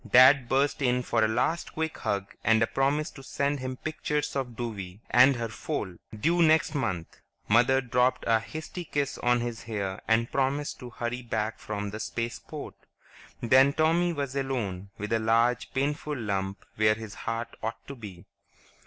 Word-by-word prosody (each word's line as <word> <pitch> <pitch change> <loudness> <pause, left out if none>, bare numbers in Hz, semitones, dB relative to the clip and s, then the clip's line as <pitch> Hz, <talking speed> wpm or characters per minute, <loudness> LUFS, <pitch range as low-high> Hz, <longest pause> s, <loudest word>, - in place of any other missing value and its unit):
Dad 130 +1 +7
burst 140 +2 +2
in 125 -1 +2
for 115 -2 +1
a - - +4
last 125 +9 0
quick 160 0 -3
hug 100 -1 -2
and 110 +1 +4
a - - +4
promise 140 +5 0
to 135 - -12
send 140 +1 -1
him 130 0 -4
pictures 150 -1 -2
of 125 -4 -2
Douwie 105 -6 -5
and 130 +2 +7
her 115 -1 -2
foal, 110 - -4 0.2
due 170 +9 +2
next 160 -1 +4
month; 90 - -3 0.3
Mother 120 +5 +4
dropped 125 0 +1
a 115 -1 +4
hasty 155 +9 -7
kiss 145 -3 -2
on 120 0 +2
his 120 -1 -4
hair 100 -4 -3
and 115 +1 +2
promised 140 +2 0
to 125 - -8
hurry 120 +1 -4
back 110 -2 -2
from 105 -1 -4
the 110 - -6
Spaceport. 115 +2 -5 0.7
Then 130 +4 +6
Tommy 165 +3 +3
was 140 -4 -3
alone, 110 -9 -2
with 105 +3 -3
a 115 - +3
large, 115 +2 +2
painful 145 +2 -1
lump 100 -3 -3
where 110 0 +4
his 110 -2 -8
heart 115 +2 -4
ought 110 +1 -4
to 140 - -6
be. 100 -8 -10
120 Hz, 170 wpm, -28 LUFS, 110-140 Hz, 0.7 s, Dad